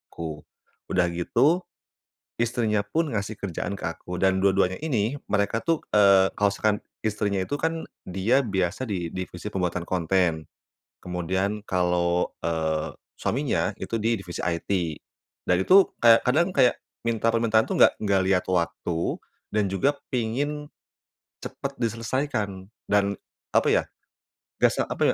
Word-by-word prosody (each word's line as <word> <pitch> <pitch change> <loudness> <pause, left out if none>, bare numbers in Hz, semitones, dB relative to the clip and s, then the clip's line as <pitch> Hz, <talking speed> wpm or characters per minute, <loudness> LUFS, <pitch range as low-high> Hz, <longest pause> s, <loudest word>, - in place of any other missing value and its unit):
aku. 80 -3 -5 0.5
Udah 90 -2 +1
gitu, 125 - +2 0.8
istrinya 115 -3 +1
pun 160 +9 -1
ngasih 105 +1 -3
kerjaan 95 0 -3
ke - - -2
aku. 90 +1 -6
Dan 95 0 +2
dua-duanya 95 -1 +3
ini 120 -4 0 0.2
mereka 105 +2 +1
tuh, 165 -2 +1 0.2
eee, 100 -2 +6
kalau 100 -1 +2
misalkan 105 +1 +1 0.2
istrinya 105 -2 -1
itu 145 +10 -2
kan 160 +2 -2 0.2
dia 105 +9 +1
biasa 95 +2 -1
di 95 -8 -2
divisi 95 +1 -6
pembuatan 90 -3 -2
konten. 85 -2 +1 0.6
Kemudian 95 +4 -2
kalau, 90 -2 +1
eee, 80 -2 -1 0.2
suaminya - - 0
itu - - -4
di 115 -1 0
divisi 90 -3 -6
IT. 85 0 -2 0.8
Dan 90 +1 +3
itu 190 - +7 0.2
kayak 115 -1 +8
kadang 170 +8 +3
kayak 130 -5 +4 0.3
minta 115 -1 0
permintaan 115 -1 +3
itu - - -2
enggak - - +7
enggak 100 -3 +2
lihat 95 -1 +2
waktu, 85 -2 -1 0.3
dan 105 -1 +1
juga 135 +10 +1 0.2
pengen, 140 +5 -2 0.8
cepet 135 0 -6
diselesaikan 115 -4 -2 0.2
dan 100 0 +3 0.4
apa - - +3
ya, - - +3 0.8
gak - - +6
s - - -6
apa - - -6
100 Hz, 135 wpm, -25 LUFS, 90-115 Hz, 0.8 s, kayak